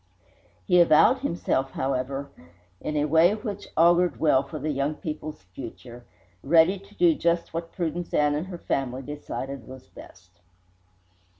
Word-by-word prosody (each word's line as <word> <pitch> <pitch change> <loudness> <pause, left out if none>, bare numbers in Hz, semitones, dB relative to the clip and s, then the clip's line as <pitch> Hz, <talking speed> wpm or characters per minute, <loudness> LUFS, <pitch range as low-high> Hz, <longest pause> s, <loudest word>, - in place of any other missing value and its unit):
He 180 -3 +5
avowed 170 - +5
himself, 170 - -1
however, 135 +1 -2 0.5
in 150 0 -3
a 145 - +2
way 165 +6 +4
which 210 -2 -6
augured 170 0 +4
well 150 -4 +4
for 140 +2 -8
the 150 +1 -2
young 140 +2 -1
people's 155 - -7
future, 120 0 -10 0.4
ready 165 +6 +4
to 200 +2 -19
do 175 -3 +4
just 170 +1 -1
what 165 0 -4
Prudence 175 0 -3
Ann 150 0 +2
and 155 +5 -3
her 180 -2 -7
family 135 -4 -3
decided 140 -2 -6
was 130 -2 -11
best. 90 -1 -16
150 Hz, 145 wpm, -25 LUFS, 135-170 Hz, 0.5 s, He